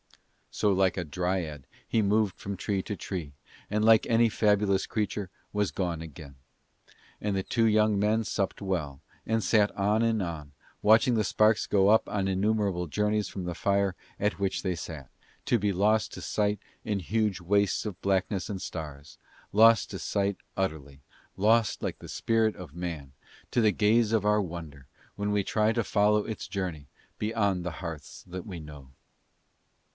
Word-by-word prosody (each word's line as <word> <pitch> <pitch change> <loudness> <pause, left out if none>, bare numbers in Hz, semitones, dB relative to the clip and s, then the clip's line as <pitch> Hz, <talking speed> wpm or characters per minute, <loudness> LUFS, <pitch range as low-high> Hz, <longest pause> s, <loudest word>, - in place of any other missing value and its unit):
So, 105 - +2
like 95 0 +2
a 90 - -1
dryad 85 -3 -3 0.2
he 115 - +2
moved 105 -1 +2
from 100 -1 -5
tree 100 +1 -1
to 105 - -4
tree, 85 -7 -5 0.4
and 105 +1 +1
like 110 -1 +6
any 115 0 +4
fabulous 105 -2 +2
creature 105 -2 -2 0.2
was 105 -2 0
gone 85 -4 -2
again. 75 -3 -10 0.9
And 105 -2 -1
the 95 - -1
two 115 +3 +1
young 105 -1 +3
men 110 +2 +2
supped 100 -2 -2
well, 80 -8 -2 0.3
and 110 0 0
sat 105 +2 +3
on 105 +3 +2
and 115 -2 +2
on, 80 -5 -5 0.3
watching 115 +4 +5
the 110 -2 +2
sparks 110 +2 +3
go 100 -1 +4
up 110 +1 +4
on 100 -2 -1
innumerable 95 -2 0
journeys 105 +4 0
from 95 -3 -6
the 90 - -3
fire 100 0 +1 0.2
at 105 0 0
which 100 -1 -1
they 95 -2 0
sat, 75 -6 -8 0.4
to 120 - +3
be 100 0 +1
lost 105 +3 +2
to - - -7
sight 105 -1 0 0.2
in 105 -2 -1
huge 105 0 0
wastes 100 +4 +1
of 105 -4 -6
blackness 95 -1 0
and 95 -3 -4
stars, 75 -3 -7 0.3
lost 115 +1 +6
to - - -5
sight 100 -1 -1 0.2
utterly, 75 -7 -3 0.4
lost 110 +2 +3
like - - -3
the - - -11
spirit 115 -1 +1
of 85 -5 -10
man 80 -6 -5 0.4
to 120 - +2
the 110 -2 +4
gaze 110 +2 +3
of 110 -3 +1
our 105 0 +3
wonder 80 -7 -7 0.3
when 105 +1 -2
we 105 -1 +1
try 110 +2 +2
to 115 0 0
follow 105 0 +2
its 110 - -5
journey 90 -8 -4 0.3
beyond 100 -4 0
the 90 - -3
hearths 80 -5 -7
that 90 0 -7
we 90 -4 -6
know. 75 -3 -11
100 Hz, 170 wpm, -28 LUFS, 90-105 Hz, 0.9 s, like